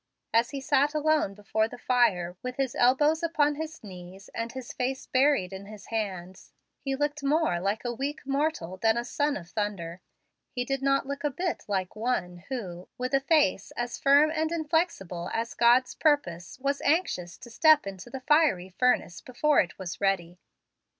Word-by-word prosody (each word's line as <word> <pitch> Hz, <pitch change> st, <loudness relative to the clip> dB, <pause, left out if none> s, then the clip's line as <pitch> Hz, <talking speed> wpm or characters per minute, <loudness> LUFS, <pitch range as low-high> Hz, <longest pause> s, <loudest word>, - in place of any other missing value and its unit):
As 230 Hz, +1 st, +3 dB
he 280 Hz, -1 st, -5 dB
sat 285 Hz, +2 st, +2 dB
alone 305 Hz, -9 st, +1 dB
before 220 Hz, +1 st, 0 dB
the 245 Hz, -, -10 dB
fire, 215 Hz, -9 st, +1 dB
with 250 Hz, 0 st, -5 dB
his 270 Hz, -3 st, -1 dB
elbows 295 Hz, +6 st, +3 dB
upon 305 Hz, -3 st, +2 dB
his 315 Hz, -1 st, -7 dB
knees 185 Hz, 0 st, -11 dB
and 230 Hz, 0 st, -4 dB
his 260 Hz, -1 st, -7 dB
face 260 Hz, +1 st, -2 dB
buried 260 Hz, -8 st, +2 dB
in 195 Hz, +1 st, -8 dB
his 210 Hz, -1 st, -11 dB
hands, 190 Hz, -4 st, -4 dB, 0.3 s
he 275 Hz, -1 st, -2 dB
looked 295 Hz, +1 st, -2 dB
more 290 Hz, -, +2 dB
like 200 Hz, +6 st, -2 dB
a 240 Hz, -, -1 dB
weak 280 Hz, +5 st, -4 dB
mortal 275 Hz, -, -1 dB
than 225 Hz, +3 st, +2 dB
a 240 Hz, -, -2 dB
"son 290 Hz, +4 st, 0 dB
of 170 Hz, -1 st, -11 dB
thunder." 185 Hz, -5 st, -3 dB, 0.5 s
He 245 Hz, -1 st, -3 dB
did 270 Hz, +1 st, -2 dB
not 275 Hz, 0 st, +2 dB
look 280 Hz, +2 st, -5 dB
a 295 Hz, -, +2 dB
bit 345 Hz, +5 st, -3 dB
like 190 Hz, -2 st, -2 dB
one 215 Hz, -6 st, -2 dB
who, 185 Hz, -9 st, -6 dB
with 255 Hz, +2 st, -3 dB
face 290 Hz, -, +3 dB
as 240 Hz, -1 st, -3 dB
firm 285 Hz, +3 st, +5 dB
and 315 Hz, 0 st, -1 dB
inflexible 310 Hz, -, -1 dB
as 230 Hz, 0 st, -2 dB
God's 240 Hz, +2 st, +4 dB
purpose, 180 Hz, -, 0 dB
was 275 Hz, +1 st, -1 dB
anxious 285 Hz, -, 0 dB
to 240 Hz, -, -12 dB
step 310 Hz, +2 st, +5 dB
into 195 Hz, +3 st, -8 dB
the 265 Hz, +2 st, -7 dB
fiery 295 Hz, -, +3 dB
furnace 190 Hz, -4 st, +1 dB
before 290 Hz, +4 st, +2 dB
it 175 Hz, -, 0 dB
was 185 Hz, -1 st, -6 dB
ready. 180 Hz, -3 st, 0 dB
245 Hz, 175 wpm, -28 LUFS, 195-290 Hz, 0.5 s, firm